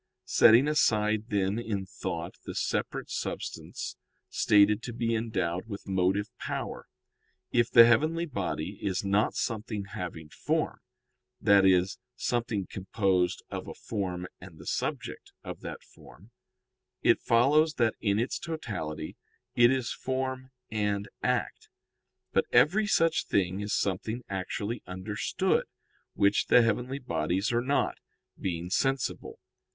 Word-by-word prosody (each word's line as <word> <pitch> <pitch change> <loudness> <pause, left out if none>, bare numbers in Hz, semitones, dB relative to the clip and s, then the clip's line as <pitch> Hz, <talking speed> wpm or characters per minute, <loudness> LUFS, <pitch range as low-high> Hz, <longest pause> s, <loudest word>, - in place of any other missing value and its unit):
Setting 120 +5 +6
aside, 110 -7 +2
then, 100 0 0
in 105 -5 -3
thought, 85 -2 -5
the - - -7
separate - - -2
substance - - -5 0.3
stated 105 +1 +4
to 120 - -6
be 115 0 -1
endowed 95 -5 -1
with 100 -1 -7
motive 95 +2 +1
power, - - -4 0.6
if 120 0 +3
the 115 -1 +9
heavenly 155 +9 +3
body 100 - -4
is 95 0 -1
not 100 +2 +2
something 110 -3 -3
having 90 -5 -6
form - - -1 0.6
that 100 -1 +5
is, 95 0 +3 0.2
something 115 -5 -1
composed 95 -2 0
of - - -5
a - - -7
form 90 -4 -4
and 90 -3 -12
the - - -12
subject - - -4
of - - -7
that - - -7
form 100 +9 -17 0.7
it - - +4
follows 150 +7 +4
that 115 -3 +2
in 100 -2 +1
its 120 +4 -1
totality 105 - -5 0.4
it 120 0 +6
is 130 -2 0
form 130 0 -3 0.2
and 105 -2 -1
act. - - -1 0.6
But - - +3
every 205 +7 +4
such 165 -5 +2
thing 95 -1 +1
is 105 0 -4
something 110 +5 -1
actually 100 +4 -3
understood, 95 +3 -1 0.5
which 100 +1 +3
the 120 - +6
heavenly 125 +4 0
bodies 100 -6 -1
are 120 - +2
not, 140 +3 0 0.4
being 90 -1 -4
sensible. 135 +4 -1
105 Hz, 130 wpm, -29 LUFS, 95-120 Hz, 0.7 s, the